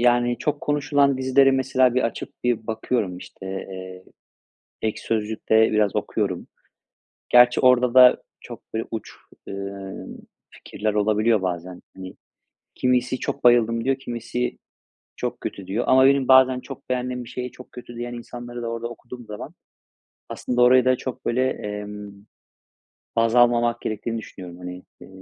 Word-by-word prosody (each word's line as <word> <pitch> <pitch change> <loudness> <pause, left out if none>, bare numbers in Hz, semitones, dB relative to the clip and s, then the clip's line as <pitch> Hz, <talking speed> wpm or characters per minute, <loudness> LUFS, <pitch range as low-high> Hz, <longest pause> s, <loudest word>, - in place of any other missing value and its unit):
yani 120 0 +3
çok 145 +3 -2
konuşulan 145 -2 +1
dizileri 135 +1 +4
mesela 130 -1 +2
bir 130 - +2
açıp 115 - -3
bir 120 -3 0
bakıyorum. 110 -4 -2
İşte, 95 - -11
eee, 95 -1 -7 0.8
Ekşi 110 -1 -2
Sözlük'te 110 0 +1
biraz 105 -2 +2
okuyorum. - - -2 0.8
Gerçi 125 0 +6
orada 125 -1 +4
da 125 -1 +7 0.2
çok, - - -10
böyle, 110 - -1
uç, 110 -2 -5 0.4
ımm, 100 0 -7 0.3
fikirler 105 0 -4
olabiliyor 105 0 +2
bazen. 90 0 -4
Hani, 95 -1 -9 0.6
kimisi 125 0 +1
"Çok 140 - -4
bayıldım" 115 -1 +4
diyor, 135 0 +1
kimisi, 120 -1 -4 0.6
"Çok - - -4
kötü" 95 -2 -6
diyor. 110 +5 -1
Ama 130 0 +6
benim 135 -1 +3
bazen 130 -1 +6
çok 135 0 -11
beğendiğim 125 0 -2
bir - - -12
şeye 125 0 -5
çok 125 - -14
kötü 120 -1 -10
diyen 120 +1 -5
insanları 120 0 -8
da - - -3
orada 115 0 -3
okuduğum 120 +1 -11
zaman 105 -1 -8 0.8
aslında 125 0 -2
orayı 125 +1 +6
da 130 0 +3
çok 130 0 -7
böyle, 130 +2 +1
emm, 105 -1 -6 1.0
baz 115 +1 +2
almamak 120 -1 +3
gerektiğini 110 +2 -3
düşünüyorum. 90 -5 -9
Hani, 90 0 -8 0.2
eee, - - -12
120 Hz, 145 wpm, -23 LUFS, 105-125 Hz, 1.0 s, da